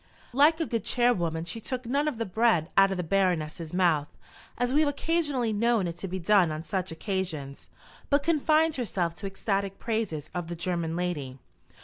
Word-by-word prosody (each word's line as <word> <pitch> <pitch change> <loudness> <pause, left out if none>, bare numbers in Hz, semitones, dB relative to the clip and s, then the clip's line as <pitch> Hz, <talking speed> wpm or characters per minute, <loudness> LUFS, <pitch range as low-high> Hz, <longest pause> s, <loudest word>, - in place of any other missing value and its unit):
Like 300 +5 +5
a 325 - +1
good 230 -7 -2
chairwoman, 175 -10 +1
she 200 +7 -6
took 255 +2 -4
none 280 +5 0
of 290 -6 -2
the 230 - -2
bread 190 -5 +2
out 195 0 +6
of 190 - -2
the 180 - -1
Baroness's 165 -3 0
mouth 170 -5 +2 0.5
as 245 +1 0
we 295 - +4
have 310 -2 +3
occasionally 285 -6 0
known 225 -1 +2
it 170 -1 -4
to 190 - -5
be 190 +1 -4
done 185 -2 +3
on 155 +1 -4
such 185 0 -2
occasions 160 -6 -4 0.4
but 285 0 +3
confined 315 0 +3
herself 180 -8 -1
to 195 +4 -6
ecstatic 195 0 -2
praises 215 -10 -3
of 175 -2 -3
the 170 - -5
German 170 -1 -2
lady. 155 -7 -3
195 Hz, 190 wpm, -28 LUFS, 170-245 Hz, 0.5 s, out